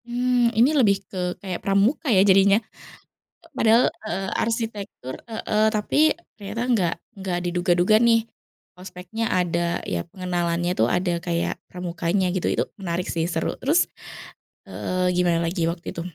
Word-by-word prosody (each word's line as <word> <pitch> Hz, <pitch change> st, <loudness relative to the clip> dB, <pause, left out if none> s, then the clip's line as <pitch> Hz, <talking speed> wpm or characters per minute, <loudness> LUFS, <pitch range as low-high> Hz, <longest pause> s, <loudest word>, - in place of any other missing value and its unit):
Mmm, 245 Hz, 0 st, +2 dB
ini 250 Hz, +7 st, +5 dB
lebih 220 Hz, -9 st, +4 dB
ke 180 Hz, -2 st, -4 dB
kayak 185 Hz, -3 st, -5 dB
pramuka 200 Hz, +9 st, +1 dB
ya 195 Hz, -4 st, +5 dB
jadinya, 195 Hz, +1 st, +5 dB, 0.9 s
padahal 235 Hz, -4 st, +4 dB, 0.2 s
heeh, 190 Hz, -1 st, -3 dB
arsitektur 220 Hz, -, -3 dB
heeh, 220 Hz, -1 st, 0 dB
tapi 290 Hz, +9 st, +3 dB, 0.2 s
ternyata 210 Hz, +3 st, -4 dB
enggak 185 Hz, -8 st, +2 dB, 0.2 s
enggak 190 Hz, -2 st, -2 dB
diduga-duga 175 Hz, +2 st, +2 dB
nih, 230 Hz, -1 st, +3 dB, 0.5 s
ospeknya 185 Hz, +4 st, -5 dB
ada 175 Hz, -3 st, 0 dB
ya 85 Hz, -1 st, -3 dB
pengenalannya 175 Hz, -2 st, -2 dB
itu 110 Hz, -, +4 dB
ada 175 Hz, +6 st, 0 dB
kayak 170 Hz, 0 st, -2 dB
pramukanya 180 Hz, +1 st, -1 dB
gitu 180 Hz, 0 st, -2 dB
itu -, -, +1 dB, 0.2 s
menarik 180 Hz, -2 st, -3 dB
sih 165 Hz, -1 st, -1 dB
seru 165 Hz, -2 st, -2 dB
terus 310 Hz, +6 st, +2 dB, 0.8 s
heeh, 185 Hz, 0 st, -1 dB
gimana 175 Hz, -2 st, +1 dB
lagi 165 Hz, -1 st, 0 dB
waktu 170 Hz, 0 st, -6 dB
itu? 170 Hz, -, -5 dB
185 Hz, 140 wpm, -23 LUFS, 175-220 Hz, 0.9 s, ini